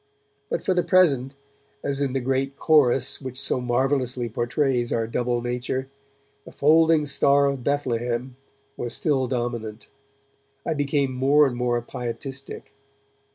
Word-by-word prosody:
But - - -2
for 185 - +2
the 180 - +2
present, 155 -7 +3 0.5
as 140 0 -2
in 135 -2 0
the 135 - 0
great 135 +2 -1
chorus 135 -4 +3
which 130 -1 -5
so 140 -2 0
marvellously 125 0 0
portrays 120 +2 0
our 115 -1 0
double 120 +1 -1
nature, 125 +2 -3 0.5
'the - - -13
folding 160 +1 +4
star 140 0 +3
of 140 -3 -1
Bethlehem' 125 -3 -1 0.4
was 120 -1 -5
still 135 -5 0
dominant. 120 -3 -4 0.8
I - - 0
became 145 -2 0
more 140 +4 +4
and 130 -3 -1
more 120 0 0
pietistic. 130 +3 -7
130 Hz, 135 wpm, -24 LUFS, 120-140 Hz, 0.8 s, folding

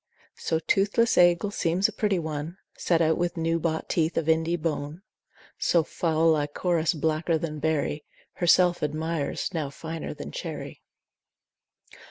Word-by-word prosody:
So 160 - 0
toothless 200 +7 +2
Aegle 175 +3 +4
seems 175 +2 +2
a - - -7
pretty 205 -3 0
one, 160 +1 -4 0.2
Set 170 -1 +1
out 160 +1 +2
with 175 0 -1
new 165 0 0
bought 160 -1 -2
teeth 165 -1 0
of 160 - 0
Indy 160 +1 +2
bone: 155 +1 -4 0.6
So 170 -2 +3
foul 165 0 +1
Lychoris 160 +3 0
blacker 160 +2 0
than 155 -1 -4
berry 150 -1 -1 0.3
Herself 175 0 +3
admires, 155 +2 -2
now 155 -4 -2
finer 160 +3 -6
than - - -8
cherry. - - -6
165 Hz, 140 wpm, -26 LUFS, 155-175 Hz, 0.6 s, Aegle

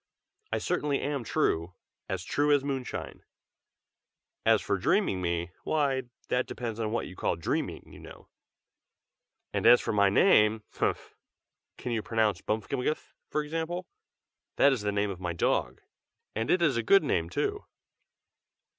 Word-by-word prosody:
"I - - +1
certainly 150 -5 0
am 140 -3 -2
true, 85 -4 0 0.3
as 95 -2 -2
true 145 +8 +1
as 145 -2 +4
moonshine. 135 -3 -4 1.2
As - - +6
for - - -1
dreaming 95 -1 +1
me, 85 -1 -1
why, 135 -5 0 0.2
that 125 0 +1
depends 115 -2 -5
on 110 -1 -1
what 115 - -1
you 95 - -10
call - - 0
dreaming, 80 - -2
you - - -12
know. - - -13 1.3
And - - +2
as 120 +1 +9
for - - -2
my 100 -1 +4
name 105 - +4
humph! - - -2 0.6
can 125 - -5
you 115 -2 0
pronounce 105 -4 0
Bmfkmgth, 125 +7 -2 0.2
for 150 - 0
example? 165 +4 -3 0.7
that 140 - +5
is 125 - -2
the 105 0 0
name 100 0 0
of 90 - -7
my 90 -1 -2
dog, 85 - 0 0.5
and 115 +1 -2
it 180 -1 +3
is 140 -7 +3
a - - +2
good 195 - +5
name, 85 - 0
too." - - -2
115 Hz, 155 wpm, -29 LUFS, 100-145 Hz, 1.3 s, as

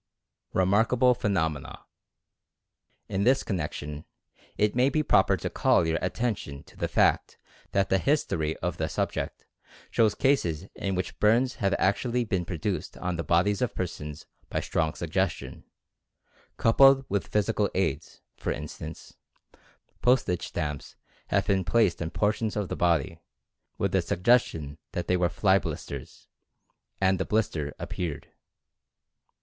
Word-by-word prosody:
REMARKABLE 115 +7 +3
PHENOMENA. 80 - -2 1.2
In 95 +1 -1
this 130 +4 +3
connection, 75 -5 -4 0.5
it 105 +1 +2
may 125 +2 +4
be 155 +2 +1
proper - - +4
to - - -4
call 85 - +3
your 80 0 -1
at 90 -1 -2
tention 105 - -3
to - - -19
the - - -2
fact - - +2 0.3
that 95 -1 +1
the 95 - +3
history 85 - 0
of - - -1
the - - -1
subject - - -3 0.5
shows 110 -3 +3
cases 90 - +1
in 95 -1 -3
which 90 -1 -4
burns 120 +5 +3
have 100 0 +2
actually 120 +6 +1
been 95 -6 -1
produced 85 -3 -3
on 90 -1 -2
the 85 - -3
bodies 90 +6 +2
of 125 - -1
persons 75 -4 -5 0.2
by - - -1
strong 80 -2 -1
suggestions, 85 -6 -2 0.9
coupled 135 +3 +6
with 100 0 -1
physical 105 -3 +1
aids, - - -2
for - - -3
instance, 80 +2 -7 0.8
postage 125 -8 +2
stamps 75 -3 -4 0.3
have - - +1
been 95 -1 +2
placed 95 -1 +2
on 85 - -2
portions 105 +3 0
of 105 -3 -2
the - - -2
body, 85 0 +1 0.6
with - - 0
the - - +2
sug 90 - -4
gestion 80 - +2
that 90 - -2
they 90 - +2
were 90 -1 +2
fly 95 +2 +3
blisters, 70 -6 -7 0.7
and 95 -1 +2
the - - +1
blister 85 -10 -1
ap - - -6
peared. 80 -6 -4
95 Hz, 145 wpm, -27 LUFS, 80-110 Hz, 1.2 s, coupled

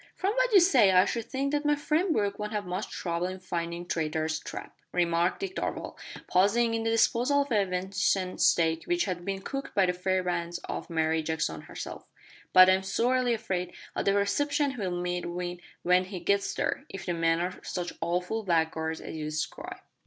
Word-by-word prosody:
"From 390 +2 0
what - - +2
you 405 - +8
say 270 - +5
I 185 0 +6
should 230 -2 -2
think 275 +1 -2
that 295 0 0
my 295 0 +3
friend 310 +5 +1
Brooke 200 -7 0
won't 210 +1 -4
have 205 -2 -2
much 180 +4 -3
trouble 170 0 -2
in 185 0 -6
findin' 170 -1 -4
Traitor's 160 -1 -1
Trap," - - -8 0.2
remarked 170 - +1
Dick 390 -1 -4
Darvall, - - -3 0.3
pausing 225 +5 +3
in 225 - 0
the 225 - 0
disposal 245 +5 +3
of 280 - -14
a 205 -3 +3
venison 185 0 0
steak 165 -1 +3
which 350 0 +1
had 180 -2 -3
been 195 +1 -3
cooked 275 0 -5
by 195 - +5
the 180 - +1
fair 185 +1 0
bands 175 -1 -2
of - - -5
Mary 160 -1 +1
Jackson 160 0 -2
herself, - - -8 0.4
"but 185 0 +9
I'm 185 0 +4
sorely 240 +5 +1
afraid 185 -5 -3 0.2
o' - - 0
the 195 - +2
reception 285 +8 +1
he'll 210 -8 -3
meet 175 0 -2
with 175 0 -4 0.2
when 180 +1 +4
he 185 -1 -6
gets 200 +3 +1
there, - - -1
if 195 - -7
the 175 - -1
men 165 0 +2
are 180 +1 -3
such 175 -1 -4
awful 180 +6 -1
blackguards 160 -3 0
as - - -7
you 155 -1 -4
describe." 155 0 -4
185 Hz, 195 wpm, -28 LUFS, 175-230 Hz, 0.4 s, but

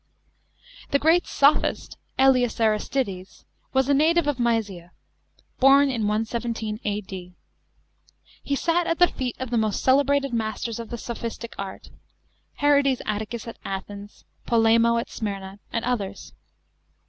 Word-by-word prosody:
§ - - -46 0.8
11. - - -29
The - - +6
great 325 +4 +3
sophist, 285 +1 +2 0.2
^ELIUS 255 -3 +3
ARISTIDES, 215 -3 -1 0.3
was 265 -1 +2
a 285 - +3
native 320 +3 +3
of 290 -3 -1
Mysia 210 -7 -1 0.7
(born 275 +1 +6
in 225 -4 -1
117 220 0 -2
A.D.). 190 -3 -5 1.1
He 280 - -2
sat 340 +4 +1
at 330 - 0
the 355 - +6
feet 250 -3 -4
of 260 -2 -5
the 235 - +2
most 215 -2 -1
celebrated 275 0 +3
masters 225 0 -3
of 230 - -7
the 240 - -5
soptiistic 235 0 -6
art, 195 -1 -7 0.6
Herodes 280 -3 +2
Atticus 215 +2 -4
at 230 - -9
Athens, 200 +1 -7 0.2
Polemo 230 0 +4
at 230 - -2
Smyrna, 195 -2 -5
and 230 - -2
others. 205 -6 -3
235 Hz, 135 wpm, -24 LUFS, 210-270 Hz, 1.1 s, The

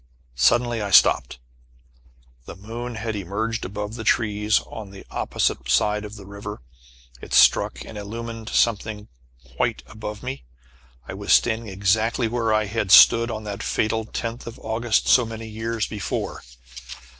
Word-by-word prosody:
Suddenly 120 - +2
I 100 - -3
stopped. 95 - +4 1.1
The - - -8
moon 115 +4 -7
had 110 0 -4
emerged 105 +4 -3
above 105 +2 -5
the 115 -1 -6
trees 105 -2 +2
on 110 -3 -9
the 100 0 -12
opposite 60 - -1
side 105 +11 +2
of 105 +1 -9
the 100 -2 -11
river. 100 +1 -8 0.6
It - - -4
struck - - +4
and 105 - -8
illumined 115 +2 -7
something 105 -2 0 0.5
white - - -1
above 105 - -8
me. 130 +1 -5 0.6
I - - -6
was 100 +1 -4
standing 115 -1 +3
exactly 110 +5 +1
where 115 -1 -1
I 110 0 +2
had 105 -1 -2
stood 115 +4 +8
on 110 -1 -5
that 105 0 -6
fatal 110 0 -1
tenth 115 +2 -5
of 115 - -8
August, 110 +1 0
so 125 - +6
many 115 0 -7
years 110 0 -3
before. 105 -4 -4
110 Hz, 150 wpm, -23 LUFS, 105-115 Hz, 1.1 s, stood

